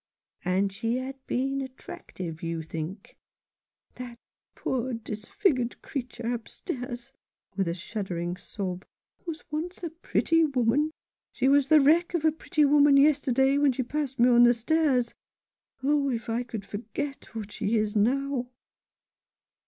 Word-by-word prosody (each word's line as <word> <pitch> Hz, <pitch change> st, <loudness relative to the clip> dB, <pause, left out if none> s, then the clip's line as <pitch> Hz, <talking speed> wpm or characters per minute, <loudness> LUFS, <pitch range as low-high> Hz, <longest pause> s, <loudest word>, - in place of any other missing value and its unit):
" -, -, -67 dB
And 190 Hz, +2 st, +1 dB
she 225 Hz, +4 st, -1 dB
had 265 Hz, +1 st, -5 dB
been 270 Hz, +2 st, 0 dB
attractive, 185 Hz, -, -8 dB
you 165 Hz, -1 st, -3 dB
think? 165 Hz, +5 st, -7 dB, 0.3 s
" -, -, -49 dB
"That 245 Hz, -1 st, -7 dB, 0.4 s
poor 255 Hz, 0 st, -2 dB
disfigured 235 Hz, -, -1 dB
creature 245 Hz, -3 st, -4 dB
upstairs" 245 Hz, 0 st, -6 dB, 0.2 s
— -, -, -47 dB
with 195 Hz, -3 st, 0 dB
a 170 Hz, -, -1 dB
shuddering 175 Hz, -2 st, -4 dB
sob 185 Hz, -1 st, -5 dB, 0.2 s
— -, -, -43 dB
"was 325 Hz, -2 st, -5 dB
once 340 Hz, +5 st, -4 dB
a 335 Hz, -, -3 dB
pretty 330 Hz, 0 st, +2 dB
woman. 275 Hz, +1 st, +2 dB, 0.4 s
She 260 Hz, -, +1 dB
was 280 Hz, 0 st, +5 dB
the 310 Hz, +1 st, +7 dB
wreck 335 Hz, +5 st, +4 dB
of 320 Hz, -2 st, 0 dB
a 315 Hz, -, +6 dB
pretty 305 Hz, -1 st, +1 dB
woman 285 Hz, 0 st, +6 dB
yesterday 275 Hz, -1 st, +4 dB
when 285 Hz, -2 st, +4 dB
she 255 Hz, +1 st, -1 dB
passed 275 Hz, +1 st, -3 dB
me 240 Hz, +2 st, +5 dB
on 240 Hz, -1 st, +6 dB
the 240 Hz, 0 st, +7 dB
stairs. 255 Hz, -1 st, +1 dB, 0.7 s
Oh, 285 Hz, 0 st, +2 dB
if 235 Hz, -2 st, -3 dB
I 230 Hz, +2 st, 0 dB
could 225 Hz, -4 st, -6 dB
forget 240 Hz, +6 st, -6 dB
what 210 Hz, -2 st, -5 dB
she 220 Hz, +3 st, 0 dB
is 215 Hz, -1 st, 0 dB
now 255 Hz, +3 st, +1 dB
250 Hz, 150 wpm, -27 LUFS, 220-285 Hz, 0.7 s, the